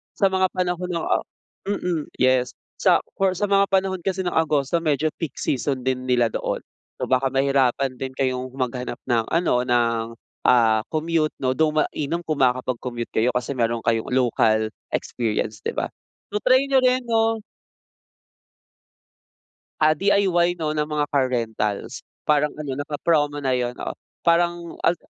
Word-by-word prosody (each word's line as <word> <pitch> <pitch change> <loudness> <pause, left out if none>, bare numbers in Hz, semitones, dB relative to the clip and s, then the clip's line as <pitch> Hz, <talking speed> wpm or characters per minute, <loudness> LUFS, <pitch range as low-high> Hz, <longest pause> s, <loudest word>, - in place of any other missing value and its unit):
sa 195 - +3
mga 190 0 +3
panahon 180 0 -1
ng 170 -2 -2
ah, - - +1 0.4
mm 180 -6 -1
yes 130 -1 +2 0.2
sa - - +4 0.2
for 190 -1 +2
sa 205 - -3
mga 200 0 +4
panahon 190 -1 +1
kasi 190 -1 -1
ng 175 - -1
Agosto 155 0 +1
medyo 155 -1 0
peak 165 - -4
season 135 -1 -1
din 130 0 -1
nila 120 -2 +2
doon - - -3 0.3
so - - -6
baka 130 +1 +3
mahirapan 135 -1 +1
din 130 0 -5
kayong 130 -1 -1
maghanap 125 -2 -3
ng 115 -3 +1
ano 175 - +2
ng 115 -2 +2 0.4
ah 115 -3 +5
commute 160 0 0
no 130 - +2
though 155 -1 +2
mainam 155 +2 -1
kung 155 -3 -2
makakapag-commute 125 -2 -1
kayo 115 +3 +2
kasi 125 +2 -1
meron 115 -3 -1
kayong 115 -1 +1
local 110 -3 +2 0.2
experience 110 -2 -2
'di - - -4
ba? - - -2 0.4
'To 210 - 0
try 255 +4 +4
niyo 275 -1 +3
rin 255 0 +2
'no. 225 -2 +1 2.4
Ah, 155 0 +5
DIY 180 -2 +2
'no 155 -2 -1
ng 150 0 -1
mga 150 -1 0
car 135 -2 +2
rentals. 110 -4 -2 0.2
Parang 150 0 +3
ano, 145 -3 -4
naka-promo 145 0 0
na 130 - +1
yun, 125 -1 -1
oo. - - -4 0.3
Parang 170 0 +2
al 170 0 +3
145 Hz, 155 wpm, -23 LUFS, 125-175 Hz, 2.4 s, ah